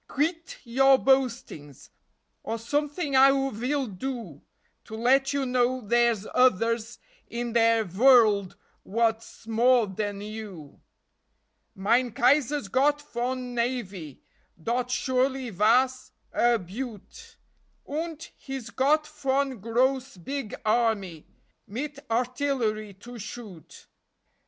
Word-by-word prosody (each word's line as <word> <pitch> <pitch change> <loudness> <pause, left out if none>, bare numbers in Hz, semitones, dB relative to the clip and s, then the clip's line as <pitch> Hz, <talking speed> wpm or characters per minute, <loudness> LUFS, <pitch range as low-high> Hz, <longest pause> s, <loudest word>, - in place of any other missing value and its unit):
Kvit 325 +4 -2
your 270 +2 +4
boastings, 250 - -1 0.5
Or 225 - -4
someting 290 +5 -2
I 265 +1 +8 0.2
vill 260 +6 -1
do 215 - -6 0.4
To 220 - -8
let 265 +4 +3
you 280 -1 -1
know 250 0 +1
dere's 235 -2 +1
oders 230 -1 +2 0.3
in 235 0 -4
De 230 -1 +4
vorld 210 -1 +4 0.3
what's 225 +1 -2
more 235 +1 +3
den 205 +1 -4
you. 205 -8 -9 0.9
Mine 235 +6 +2
Kaiser's 275 0 +2
got 285 +7 +2
von 250 -2 -4
navy 210 - -4 0.4
Dot 245 +8 -2
surely 260 0 0
vas 250 +6 +2 0.2
a 240 0 +3
beaut. 235 - -9 0.5
Unt 320 +1 -5
he's 265 -4 -7
got 295 +5 +2
von 275 -4 -1
gross 250 +3 0
big 270 +5 -5
army, 215 -8 0 0.4
Mit 280 +7 -5
artillery 235 -4 -1
to 235 +5 -11
shoot. 210 -6 -10
240 Hz, 105 wpm, -26 LUFS, 215-270 Hz, 0.9 s, I